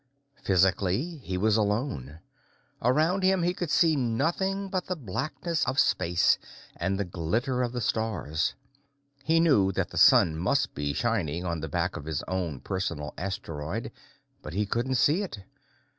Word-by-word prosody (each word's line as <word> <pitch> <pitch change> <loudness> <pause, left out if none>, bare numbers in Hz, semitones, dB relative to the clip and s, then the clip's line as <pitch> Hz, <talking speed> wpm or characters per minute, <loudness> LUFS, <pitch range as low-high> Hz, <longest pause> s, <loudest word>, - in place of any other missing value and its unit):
Physically, 95 - +1
he 95 -8 -4
was 105 +3 +2
alone. 105 - -2 0.6
Around 155 +10 +2
him, 190 -1 +3
he 175 +1 +1
could 180 -4 -4
see 160 0 +4
nothing 165 +11 0
but 185 -1 -3
the 185 - -1
blackness 155 - -3
of 130 - -1
space 90 -7 +3 0.4
and 95 +1 -1
the 100 - 0
glitter 110 - -1
of 120 -1 -1
the 120 0 -3
stars. 100 -8 -1 0.7
He 165 +1 +3
knew 120 - +4
that - - -2
the - - -7
sun 80 - +6
must 90 - +1
be 70 0 -2
shining 90 -8 -1
on 85 -2 -2
the 80 0 -5
back - - -1
of 75 - -8
his 80 -3 -3
own 90 -7 -3
personal 85 -7 -3
asteroid, 85 -5 -4 0.5
but 75 - -8
he 105 +2 +1
couldn't 120 +6 -1
see 150 - +3
it. 195 - -5
105 Hz, 160 wpm, -27 LUFS, -, 0.7 s, sun